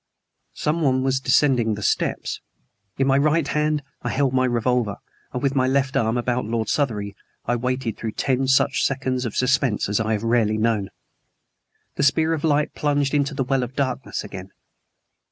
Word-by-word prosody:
Someone 150 -5 +1
was 135 0 +1
descending 130 -4 +2
the 105 - -7
steps. - - -1 0.6
In 135 - +2
my 135 0 +3
right 155 +1 +2
hand 150 -1 0 0.2
I - - -3
held 135 -1 +1
my 130 0 +3
revolver, 120 -3 0 0.4
and 125 - -4
with 135 -1 +1
my 130 -2 +2
left 135 0 +1
arm 115 +1 +1
about 125 +1 0
Lord 115 0 -2
Southery, 105 -8 -1 0.3
I 120 - +1
waited 125 -1 -2
through 110 -2 -4
ten 135 0 0
such 135 +1 +3
seconds 130 -1 -1
of 115 - -4
suspense 130 -3 +1
as 105 +1 0
I 110 0 0
have 105 0 -2
rarely 115 -2 +2
known. 110 -3 0 1.1
The - - 0
spear 160 +4 +3
of 155 - -3
light 150 -1 +1
plunged 145 -2 0
into 145 -1 +1
the 135 - 0
well 135 +1 0
of 125 +1 -5
darkness 130 -2 -2
again. 95 -2 -8
130 Hz, 175 wpm, -23 LUFS, 115-140 Hz, 1.1 s, my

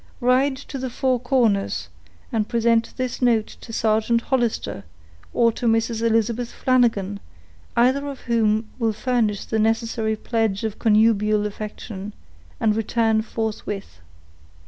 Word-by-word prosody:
Ride 260 +2 +2
to 275 0 -7
the 260 0 -3
Four 255 +1 0
Corners, 235 -6 +1 0.4
and 220 -3 -1
present 230 0 +2
this 255 -1 -3
note 230 -3 +3 0.2
to 230 - -10
Sergeant 220 +1 +1
Hollister, 240 - -1 0.5
or 230 -1 +3
to 235 - -3
Mrs. 225 0 +1
Elizabeth 230 +1 +1
Flanagan, 225 -6 +1 0.6
either 260 +4 +3
of 275 -2 -7
whom 220 -2 +1
will 225 -2 +1
furnish 220 -3 0
the 220 - -1
necessary 225 0 0
pledge 220 -2 -1
of 220 -2 -3
connubial 215 -1 +3
affection; 210 -1 -6 0.4
and 215 -1 +2
return 225 0 +1
forthwith." 210 - -5
225 Hz, 125 wpm, -23 LUFS, 215-240 Hz, 0.6 s, note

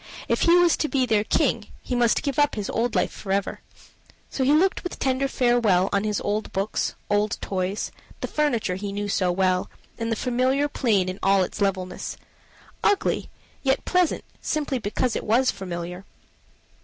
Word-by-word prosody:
If - - +1
he 340 - +6
was 350 -1 +5
to 305 - 0
be 265 -3 +1
their 215 -4 +2
king, - - +1 0.2
he - - -4
must 240 -2 +2
give 280 -1 -1
up 290 0 +3
his 210 -3 -3
old 235 +1 0
life - - +1
forever. 195 -1 -2 0.7
So 265 - -1
he 265 - +3
looked 355 +6 +3
with 360 - -5
tender 265 +1 +1
farewell 235 -8 +2
on 200 +1 +1
his 210 -1 0
old 210 +1 -2
books, 195 +3 -1
old 205 0 +1
toys, 190 +1 -2 0.3
the - - -3
furniture 250 -11 0
he 200 +2 -4
knew 205 +1 -3
so 185 -3 +1
well, 185 0 +1 0.3
and 230 0 -2
the - - +2
familiar 255 +4 +1
plain 220 -10 +1
in 185 +1 -4
all 195 -1 +4
its 180 - -6
levelness 190 -2 -2 0.7
ugly 410 -1 +1 0.3
yet 270 0 +1
pleasant, 360 -3 +1 0.2
simply 290 -4 -1
because 230 +3 -1
it - - -2
was 245 +5 +3
familiar. 180 -1 -6
220 Hz, 175 wpm, -24 LUFS, 195-265 Hz, 0.7 s, he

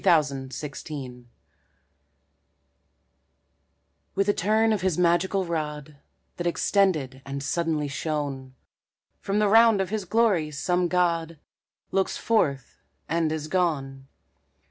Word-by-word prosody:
CLOUD 155 -4 +4 0.2
BREAK 135 -3 -7 2.9
With 195 +1 +1
a 205 - +4
turn 220 +4 +2
of 205 - -1
his 185 -3 0
magical 180 +2 +2
rod, 150 -3 -4 0.4
That 175 - -2
extended 165 -8 +1
and 140 0 -5
suddenly 155 0 -1
shone, 140 -3 -4 0.6
From 200 +1 -2
the 210 0 +3
round 225 0 +6
of 190 -1 -1
his 215 -3 -2
glory 200 -6 +2
some 175 +5 0
god 170 -2 0 0.5
Looks 190 0 0
forth 145 - 0 0.3
and 165 0 0
is 155 -1 -3
gone. 140 -6 -1
165 Hz, 110 wpm, -26 LUFS, 145-190 Hz, 2.9 s, round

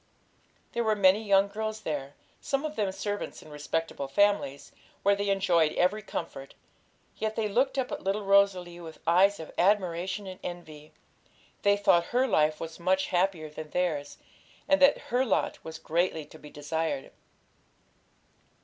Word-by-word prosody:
There 235 - -1
were 220 -1 +2
many 200 +1 +4
young 200 -1 +4
girls 215 +1 -4
there, 145 -4 -4 0.2
some 275 +2 -2
of 305 0 -4
them 205 -3 0
servants 205 +1 -5
in 155 - -14
respectable 150 -1 -3
families, 170 -3 +1 0.3
where 200 0 +4
they 200 0 -2
enjoyed 175 -5 +2
every 195 +4 +1
comfort; 150 -8 -7 0.6
yet 220 0 -2
they 220 -1 0
looked 260 +7 +1
up 260 -2 -1
at - - -5
little 200 +2 -1
Rosalie 195 -3 +3
with 165 -2 -10
eyes 190 +5 +4
of 160 - -8
admiration 185 0 +1
and 185 -1 -8
envy. 155 -4 -8 0.7
They 200 0 +3
thought 175 -4 +3
her 250 +2 +1
life 155 -7 +2
was 165 0 -7
much 190 +2 +1
happier 180 -3 0
than 155 0 -8
theirs, 155 -5 -2 0.5
and 290 0 +3
that 275 +1 +6 0.2
her 250 +1 +4
lot 260 - -1
was 160 0 -7
greatly 165 -1 -1
to 155 - -15
be 150 - -12
desired. 150 -1 -3
185 Hz, 160 wpm, -28 LUFS, 160-205 Hz, 0.7 s, that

